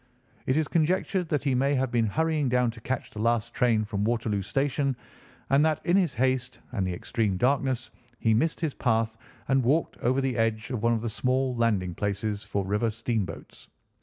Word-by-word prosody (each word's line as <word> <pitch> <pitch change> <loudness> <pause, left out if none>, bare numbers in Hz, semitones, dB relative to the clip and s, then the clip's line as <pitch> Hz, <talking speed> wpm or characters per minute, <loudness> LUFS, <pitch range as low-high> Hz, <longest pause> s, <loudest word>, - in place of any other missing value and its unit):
It 130 - +2
is 155 -2 +1
conjectured 180 +2 +1
that 150 -2 0
he 140 -2 +1
may 135 +3 +2
have 130 -1 0
been 115 -2 +2
hurrying 155 +3 +1
down 125 -1 +2
to 115 0 -13
catch 130 +3 -3
the 105 - -6
last 120 0 +1
train 115 -3 +2
from 105 -1 -2
Waterloo 110 -2 0
Station, 135 +5 0 0.6
and 140 +2 +5
that 155 -1 +2
in 175 - +3
his 180 -7 +2
haste 130 0 0
and 100 -7 -1
the - - -1
extreme 100 +1 -1
darkness 130 +1 +1 0.3
he 110 0 +2
missed 155 +9 +1
his 160 -4 -1
path 115 -2 0 0.3
and 135 -1 +3
walked 145 +7 +1
over 130 +3 +1
the 130 -2 -1
edge 115 +1 0
of 120 -5 -2
one 115 +1 +3
of 115 - -1
the 115 - -1
small 130 +2 0
landing 105 -7 +1
places 105 +2 -2
for 100 -2 -2
river 105 +4 +1
steamboats. 110 -2 -4
120 Hz, 195 wpm, -27 LUFS, 110-135 Hz, 0.6 s, and